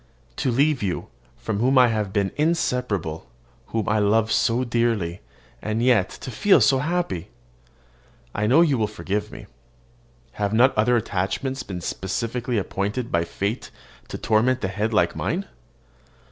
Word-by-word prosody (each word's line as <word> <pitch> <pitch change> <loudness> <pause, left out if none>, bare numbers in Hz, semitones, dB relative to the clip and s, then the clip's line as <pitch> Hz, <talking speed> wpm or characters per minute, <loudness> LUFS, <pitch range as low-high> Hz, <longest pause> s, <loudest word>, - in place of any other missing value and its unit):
To - - 0
leave 140 +3 +2
you, 95 -4 -3 0.3
from 105 -2 -3
whom 130 +4 +3
I 125 -1 +7
have 105 -3 -1
been 100 -1 0
inseparable, 125 - -1 0.4
whom 110 -3 -2
I 110 +1 +2
love 110 +2 +2
so 120 +2 +2
dearly, 115 -8 0 0.4
and 110 +2 -1
yet 120 -7 +3
to 130 - -6
feel 180 - +4
happy! 130 - +1 1.0
I 105 +1 0
know 135 +9 +5
you 145 -7 +3
will 110 - +1
forgive 105 +1 -3
me. - - -10 0.9
Have 105 0 -2
not 125 +4 +4
other 110 +3 +3
attachments 115 +6 -2
been 90 -3 -6
specially 115 +7 -3
appointed 105 +4 -2
by 85 0 +1
fate 100 +7 -3 0.4
to - - -6
torment 120 +3 +1
a 95 - 0
head 105 +4 -2
like 105 - +2
mine? - - -2
110 Hz, 145 wpm, -23 LUFS, 100-125 Hz, 1.0 s, I